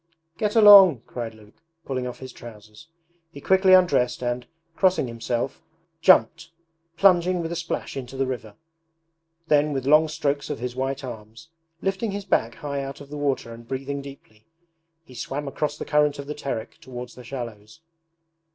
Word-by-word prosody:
'Get 210 Hz, 0 st, -1 dB
along,' 195 Hz, -, +8 dB
cried 115 Hz, -2 st, -6 dB
Luke, 110 Hz, +8 st, -20 dB, 0.2 s
pulling 130 Hz, -2 st, -3 dB
off 125 Hz, -, -7 dB
his 130 Hz, -1 st, -10 dB
trousers. 110 Hz, +3 st, -13 dB, 0.4 s
He 140 Hz, -, -10 dB
quickly 190 Hz, +4 st, +4 dB
undressed 170 Hz, -10 st, +2 dB
and, 120 Hz, 0 st, -2 dB, 0.3 s
crossing 185 Hz, -8 st, +2 dB
himself, 120 Hz, +2 st, -3 dB, 0.4 s
jumped, 165 Hz, -2 st, +4 dB, 0.5 s
plunging 180 Hz, -1 st, +4 dB
with 165 Hz, -1 st, -3 dB
a -, -, -3 dB
splash 170 Hz, 0 st, -4 dB
into 135 Hz, -1 st, -7 dB
the 135 Hz, -, +1 dB
river. 115 Hz, -5 st, -6 dB, 0.9 s
Then 150 Hz, -1 st, +3 dB
with 135 Hz, -2 st, -3 dB
long 155 Hz, +3 st, +5 dB
strokes 145 Hz, -1 st, -2 dB
of -, -, -3 dB
his 125 Hz, +1 st, -5 dB
white 135 Hz, +1 st, -3 dB
arms, 115 Hz, +4 st, -10 dB, 0.3 s
lifting 195 Hz, +4 st, -1 dB
his 200 Hz, 0 st, -5 dB
back 115 Hz, +1 st, 0 dB
high 140 Hz, -1 st, -4 dB
out 135 Hz, 0 st, -7 dB
of 140 Hz, -, -12 dB
the 150 Hz, -, -5 dB
water 135 Hz, -5 st, -1 dB
and 115 Hz, 0 st, -13 dB
breathing 135 Hz, +2 st, -4 dB
deeply, 135 Hz, -6 st, -14 dB, 0.6 s
he 130 Hz, -, -16 dB
swam 140 Hz, +3 st, -5 dB
across 150 Hz, +2 st, -3 dB
the -, -, -6 dB
current 150 Hz, -1 st, +2 dB
of 140 Hz, -, -7 dB
the 150 Hz, -, -5 dB
Terek 135 Hz, -7 st, -5 dB
towards 125 Hz, -1 st, -8 dB
the 125 Hz, -, -12 dB
shallows. 115 Hz, 0 st, -8 dB
135 Hz, 170 wpm, -24 LUFS, 120-160 Hz, 0.9 s, along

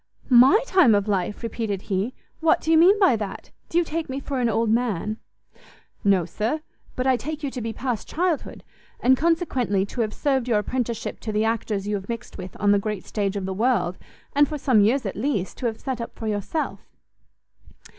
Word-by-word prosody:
"My 255 Hz, -, +8 dB
time 360 Hz, -, +5 dB
of 200 Hz, 0 st, 0 dB
life!" 200 Hz, +2 st, -1 dB
repeated 220 Hz, -4 st, -3 dB
he; 200 Hz, +5 st, -2 dB, 0.2 s
"what 320 Hz, 0 st, +3 dB
do 320 Hz, -, -1 dB
you 325 Hz, -, +6 dB
mean 375 Hz, +5 st, +6 dB
by 380 Hz, -, +5 dB
that? 205 Hz, -3 st, -6 dB, 0.2 s
do 335 Hz, -, 0 dB
you 345 Hz, -, +5 dB
take 320 Hz, -1 st, -4 dB
me 265 Hz, +1 st, -3 dB
for 275 Hz, -1 st, -3 dB
an 240 Hz, -2 st, +2 dB
old 225 Hz, 0 st, +1 dB
man?" 220 Hz, -3 st, 0 dB, 0.9 s
"No, 195 Hz, -4 st, +3 dB
sir, 220 Hz, -, -2 dB, 0.3 s
but 255 Hz, -, -2 dB
I 260 Hz, -1 st, +4 dB
take 305 Hz, +4 st, -5 dB
you 280 Hz, -, -2 dB
to 250 Hz, -, -5 dB
be 225 Hz, 0 st, -3 dB
past 245 Hz, -1 st, -3 dB
childhood, 345 Hz, -2 st, -2 dB, 0.4 s
and 260 Hz, +2 st, +5 dB
consequently 265 Hz, -, +1 dB
to 235 Hz, +4 st, -4 dB
have 215 Hz, -1 st, -2 dB
served 265 Hz, -4 st, 0 dB
your 230 Hz, -3 st, +3 dB
apprenticeship 235 Hz, +2 st, -2 dB
to 220 Hz, -, -4 dB
the 215 Hz, +1 st, +1 dB
actors 215 Hz, -3 st, -1 dB
you 210 Hz, -, -1 dB
have 195 Hz, +2 st, -10 dB
mixed 230 Hz, -1 st, -6 dB
with 185 Hz, 0 st, -8 dB
on 205 Hz, -1 st, +3 dB
the 205 Hz, -, +4 dB
great 210 Hz, -1 st, -4 dB
stage 200 Hz, -2 st, -2 dB
of 195 Hz, -2 st, -3 dB
the 190 Hz, -, -2 dB
world, 220 Hz, -4 st, +1 dB, 0.3 s
and, 290 Hz, 0 st, +4 dB
for 300 Hz, -, -4 dB
some 255 Hz, -6 st, +3 dB
years 230 Hz, +5 st, +2 dB
at 195 Hz, -, -3 dB
least, 210 Hz, -5 st, -2 dB
to 250 Hz, -, 0 dB
have 220 Hz, -1 st, -4 dB
set 260 Hz, -3 st, -4 dB
up 230 Hz, -, -7 dB
for 225 Hz, -, -7 dB
yourself." 210 Hz, -, -2 dB
230 Hz, 210 wpm, -24 LUFS, 205-270 Hz, 0.9 s, My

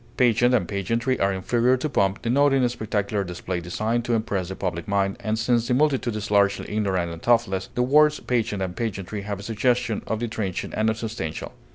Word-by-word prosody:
Pageant 120 Hz, 0 st, +4 dB
and 100 Hz, -8 st, +1 dB
pageantry 115 Hz, +7 st, -1 dB
are 95 Hz, -, +2 dB
inferior 120 Hz, +7 st, +2 dB
to 130 Hz, -, -2 dB
pomp, 100 Hz, -8 st, 0 dB
denoting 135 Hz, +1 st, +3 dB
spectacular 105 Hz, -3 st, -2 dB
display 90 Hz, 0 st, -4 dB
designed 110 Hz, +7 st, -1 dB
to 120 Hz, -, +1 dB
impress 100 Hz, -5 st, -2 dB
the 95 Hz, -, -5 dB
public 85 Hz, -3 st, -3 dB
mind, 100 Hz, -1 st, +1 dB
and 110 Hz, +1 st, -1 dB
since 120 Hz, +1 st, +1 dB
the 125 Hz, -, +2 dB
multitude 135 Hz, -5 st, +1 dB
is 105 Hz, 0 st, -4 dB
largely 100 Hz, -1 st, +2 dB
ignorant 95 Hz, -5 st, 0 dB
and 85 Hz, -, -9 dB
thoughtless, 115 Hz, -6 st, +1 dB
the 125 Hz, -, +2 dB
words 150 Hz, +3 st, +4 dB
pageant 115 Hz, -5 st, -1 dB
and 90 Hz, -1 st, -4 dB
pageantry 100 Hz, -2 st, -4 dB
have 100 Hz, -1 st, -5 dB
a -, -, -8 dB
suggestion 115 Hz, +1 st, 0 dB
of 110 Hz, -, -1 dB
the 120 Hz, -, -2 dB
transient 100 Hz, -5 st, -4 dB
and 110 Hz, +1 st, +2 dB
unsubstantial. 110 Hz, -7 st, -4 dB
110 Hz, 195 wpm, -24 LUFS, 95-120 Hz, -, Pageant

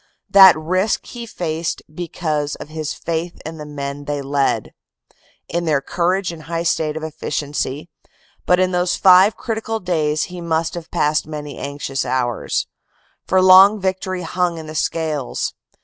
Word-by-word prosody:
That 190 Hz, -4 st, +9 dB
risk 185 Hz, +6 st, 0 dB
he 235 Hz, -1 st, -8 dB
faced 165 Hz, -4 st, -3 dB
because 155 Hz, -3 st, -2 dB
of -, -, -10 dB
his 155 Hz, -1 st, -4 dB
faith 170 Hz, +1 st, -4 dB
in 160 Hz, 0 st, -7 dB
the 150 Hz, -, -7 dB
men 140 Hz, -1 st, -6 dB
they 145 Hz, -1 st, -3 dB
led, 140 Hz, 0 st, 0 dB, 0.8 s
in 170 Hz, +1 st, -2 dB
their 150 Hz, -3 st, +2 dB
courage 180 Hz, +5 st, 0 dB
and 165 Hz, -2 st, -10 dB
high 165 Hz, +1 st, -3 dB
state 160 Hz, -2 st, 0 dB
of 160 Hz, -, -6 dB
efficiency, 150 Hz, -1 st, -3 dB, 0.6 s
but 180 Hz, 0 st, +4 dB
in 185 Hz, 0 st, +2 dB
those 180 Hz, 0 st, +1 dB
five 190 Hz, +2 st, +6 dB
critical 225 Hz, 0 st, -3 dB
days 155 Hz, -5 st, 0 dB
he 180 Hz, -1 st, -7 dB
must 165 Hz, -1 st, -1 dB
have 170 Hz, -2 st, -7 dB
passed 150 Hz, 0 st, +1 dB
many 150 Hz, -2 st, -7 dB
anxious 140 Hz, -1 st, -3 dB
hours. 125 Hz, -2 st, -1 dB, 0.6 s
For 185 Hz, 0 st, +3 dB
long 190 Hz, +3 st, +8 dB
victory 185 Hz, -1 st, -2 dB
hung 175 Hz, 0 st, -1 dB
in 160 Hz, -, -7 dB
the 155 Hz, -, -8 dB
scales. 155 Hz, -3 st, -2 dB
165 Hz, 155 wpm, -20 LUFS, 150-180 Hz, 0.8 s, That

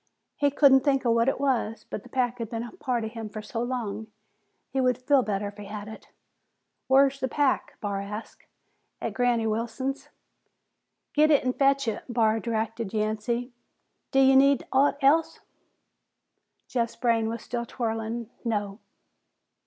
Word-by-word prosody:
He 285 Hz, -, +2 dB
couldn't 275 Hz, -1 st, +6 dB
think 270 Hz, -1 st, +1 dB
of 235 Hz, -, +4 dB
what 230 Hz, +2 st, +3 dB
it -, -, -2 dB
was, 250 Hz, -5 st, -1 dB
but -, -, -5 dB
the 250 Hz, -, -15 dB
pack 245 Hz, -1 st, -1 dB
had 230 Hz, -2 st, -4 dB
been 230 Hz, -1 st, -3 dB
a 240 Hz, -, -8 dB
part 250 Hz, -10 st, -2 dB
of 220 Hz, -, -4 dB
him 225 Hz, -2 st, -6 dB
for 215 Hz, +1 st, -7 dB
so 230 Hz, +2 st, -4 dB
long 230 Hz, -4 st, -3 dB
that -, -, -34 dB, 0.6 s
he 265 Hz, -, 0 dB
would 250 Hz, -2 st, +2 dB
feel 270 Hz, +1 st, +3 dB
better 205 Hz, -3 st, -2 dB
if 205 Hz, -, -16 dB
he 205 Hz, -, -8 dB
had 205 Hz, +1 st, -7 dB
it. 220 Hz, -, -11 dB, 0.8 s
"Whar's 275 Hz, +1 st, +4 dB
the 260 Hz, -, 0 dB
pack?" 275 Hz, +1 st, 0 dB
Barr 200 Hz, -1 st, -2 dB
asked. 210 Hz, +3 st, -8 dB, 0.5 s
"At -, -, -3 dB
Granny 245 Hz, -2 st, +1 dB
Wilson's." 230 Hz, +5 st, -3 dB, 1.0 s
"Get 305 Hz, +1 st, +4 dB
it 290 Hz, -3 st, +4 dB
an' 255 Hz, -, +1 dB
fetch 275 Hz, -1 st, +2 dB
it," 220 Hz, -1 st, -2 dB
Barr 225 Hz, -2 st, +2 dB
directed 225 Hz, -2 st, -3 dB
Yancey. 220 Hz, +4 st, -1 dB, 0.6 s
"D'ye 270 Hz, 0 st, +5 dB
need 275 Hz, 0 st, +5 dB
aught 280 Hz, +1 st, +3 dB
else?" 310 Hz, +4 st, +3 dB, 1.3 s
Jeff's 235 Hz, -2 st, -1 dB
brain 230 Hz, -2 st, +1 dB
was 230 Hz, 0 st, -5 dB
still 235 Hz, -1 st, -4 dB
whirling. 225 Hz, -1 st, -3 dB
"No." 205 Hz, -3 st, -2 dB
235 Hz, 165 wpm, -27 LUFS, 220-265 Hz, 1.3 s, couldn't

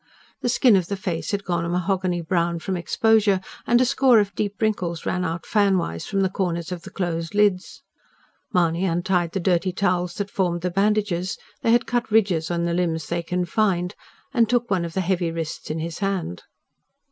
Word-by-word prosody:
The 245 Hz, -, 0 dB
skin 240 Hz, -2 st, +5 dB
of 185 Hz, -3 st, +1 dB
the 200 Hz, -, -2 dB
face 185 Hz, -5 st, -3 dB
had 200 Hz, -1 st, -1 dB
gone 175 Hz, -3 st, -1 dB
a 170 Hz, -, -3 dB
mahogany 180 Hz, 0 st, 0 dB
brown 170 Hz, 0 st, 0 dB
from 185 Hz, +3 st, -3 dB
exposure, 210 Hz, +2 st, +3 dB, 0.3 s
and 240 Hz, -, +5 dB
a 255 Hz, -, +4 dB
score 255 Hz, -1 st, +4 dB
of 205 Hz, -2 st, +2 dB
deep 205 Hz, -2 st, -3 dB
wrinkles 185 Hz, -7 st, -1 dB
ran 180 Hz, -, -1 dB
out 165 Hz, -1 st, -3 dB
fan 200 Hz, -3 st, +3 dB
wise 85 Hz, -, -3 dB
from 195 Hz, -, 0 dB
the 190 Hz, -, +2 dB
corners 175 Hz, -3 st, -2 dB
of 180 Hz, -2 st, -4 dB
the 190 Hz, -, -10 dB
closed 170 Hz, -1 st, -3 dB
lids. 205 Hz, -3 st, +1 dB, 0.7 s
Mahony 170 Hz, 0 st, +2 dB
untied 175 Hz, -1 st, 0 dB
the 195 Hz, -, -1 dB
dirty 180 Hz, 0 st, +1 dB
towels 180 Hz, -2 st, 0 dB
that 200 Hz, -1 st, -4 dB
formed 175 Hz, -3 st, 0 dB
the 180 Hz, +1 st, -1 dB
bandages 195 Hz, -2 st, 0 dB, 0.2 s
they 230 Hz, -, +2 dB
had 240 Hz, +2 st, +4 dB
cut 240 Hz, -1 st, -1 dB
ridges 195 Hz, -7 st, +2 dB
in 170 Hz, 0 st, -1 dB
the 170 Hz, -, 0 dB
limbs 165 Hz, -4 st, -1 dB
they 170 Hz, 0 st, -1 dB
confined 180 Hz, +1 st, 0 dB, 0.4 s
and 230 Hz, -4 st, +3 dB
took 240 Hz, -1 st, +1 dB
one 180 Hz, -3 st, +1 dB
of 165 Hz, -, -6 dB
the 190 Hz, -, 0 dB
heavy 180 Hz, -2 st, 0 dB
wrists 165 Hz, -1 st, -5 dB
in 155 Hz, -, -2 dB
his 165 Hz, 0 st, -4 dB
hand. 195 Hz, -, -2 dB
180 Hz, 200 wpm, -23 LUFS, 170-200 Hz, 0.7 s, skin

